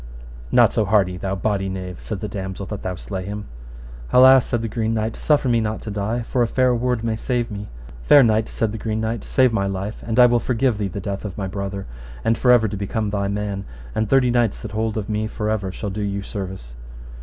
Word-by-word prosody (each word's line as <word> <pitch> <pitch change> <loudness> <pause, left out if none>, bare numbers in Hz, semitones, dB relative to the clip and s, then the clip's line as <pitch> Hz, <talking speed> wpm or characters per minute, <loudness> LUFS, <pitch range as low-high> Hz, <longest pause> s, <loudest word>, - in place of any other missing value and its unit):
Not - - +5
so - - +2
hardy, 100 -3 +2
thou 95 +2 -2
bawdy 95 0 -1
knave, 95 -1 -6
said 105 -4 -5
the 105 - -3
damosel, 95 0 -5
that 105 - -5
thou 90 -1 -3
slay 95 +2 -5
him. 105 +2 -5 0.7
Alas, 130 0 +7
said 120 -1 -1
the - - -1
Green 115 0 -1
Knight, 110 0 -1
suffer 145 -3 +2
me 115 -2 +3
not 110 0 -2
to 110 - -5
die 105 +4 -2
for 125 +2 -1
a 120 - +3
fair 130 +1 +2
word 120 -1 0
may 115 -1 0
save 120 +1 -2
me. 105 0 -6 0.3
Fair 140 - +7
knight, 110 -1 +2
said 110 -2 -1
the 110 - -5
Green 110 0 -2
Knight, 110 -1 -2
save 130 -3 +3
my 100 -3 +1
life, 100 +2 -4
and 115 +1 -1
I 125 - +9
will 120 0 +4
forgive 120 -1 0
thee 100 - 0
the 95 +2 -5
death 100 +1 -4
of 105 -4 -6
my 100 - -2
brother, 100 0 -4 0.4
and 115 - +3
for 125 +2 +3
ever 115 -2 +5
to 105 - -4
become 100 +1 -2
thy 100 -1 -1
man, 100 -1 -3 0.3
and 110 -1 -1
thirty 130 -2 +4
knights 120 -4 +1
that 110 - -6
hold 110 0 -1
of 105 -2 -3
me 110 0 -1
for 110 -1 -2
ever 100 -3 -2
shall 100 +1 -5
do 105 +2 -4
you 100 -1 -2
service. 95 - -6
105 Hz, 240 wpm, -22 LUFS, 100-115 Hz, 0.7 s, I